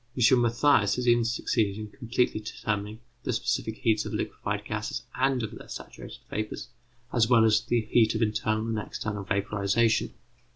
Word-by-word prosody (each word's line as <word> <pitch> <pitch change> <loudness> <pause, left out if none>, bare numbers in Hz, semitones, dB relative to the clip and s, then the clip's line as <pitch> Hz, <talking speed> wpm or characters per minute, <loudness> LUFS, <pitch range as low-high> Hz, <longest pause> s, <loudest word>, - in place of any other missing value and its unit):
M. 125 +1 +5
Mathias 120 -3 +3
has 125 0 -2
even 120 0 +5
succeeded 115 -3 0
in 110 0 -5
completely 120 +1 -1
determining 105 0 -4 0.2
the - - -2
specific 115 -2 -1
heats 110 -2 +1
of - - -5
liquefied - - -3
gases - - -3
and 130 -1 +1
of 110 - -4
their - - -11
saturated - - -9
vapours, 110 0 -4 0.4
as 115 -3 +3
well 115 -3 +6
as 110 0 +4
the 120 -1 +1
heat 110 0 +3
of 110 - +1
internal 110 0 0
and 115 -1 -1
external 105 -1 -4
vaporization. 100 +2 +1
110 Hz, 165 wpm, -27 LUFS, 105-120 Hz, 0.4 s, well